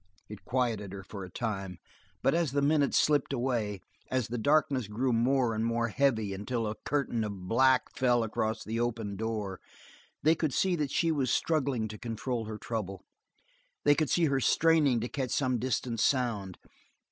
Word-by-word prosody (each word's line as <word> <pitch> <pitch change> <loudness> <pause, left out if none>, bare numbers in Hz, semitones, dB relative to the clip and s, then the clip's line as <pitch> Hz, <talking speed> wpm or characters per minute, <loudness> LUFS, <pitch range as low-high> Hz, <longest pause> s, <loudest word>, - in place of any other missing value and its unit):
It 105 -1 -10
quieted 115 -6 -1
her 100 -1 -7
for 100 0 -8
a 90 - -8
time, 95 -3 -4 0.5
but 135 - +3
as 165 -5 +1
the 140 - +2
minutes 145 -1 +3
slipped 145 -3 +2
away, 120 -6 -1 0.3
as 130 -4 -1
the 120 - -3
darkness 140 -2 +2
grew 120 +4 0
more 125 +1 +2
and 110 +1 -1
more 115 0 0
heavy 110 -5 +1
until 115 +4 -2
a 105 - -2
curtain 120 -1 -1
of 100 -4 -6
black 130 +4 +4
fell 120 -2 +3
across 110 0 -2
the 115 +2 -3
open 115 -4 -2
door, 105 -3 -3 0.6
they 155 +2 +6
could 155 -5 -1
see 190 -2 +2
that 150 -4 -1
she 165 +4 +1
was 140 -5 0
struggling 140 -8 +1
to 105 0 -9
control 115 0 -3
her 110 0 -6
trouble, 105 -4 -5 0.8
they 145 - +6
could 150 0 0
see 175 - +3
her 140 -3 +1
straining 150 -4 +3
to 120 - -2
catch 130 -1 -3
some 130 -2 0
distant 120 -1 -2
sound. 110 -8 0
120 Hz, 180 wpm, -30 LUFS, 110-135 Hz, 0.8 s, they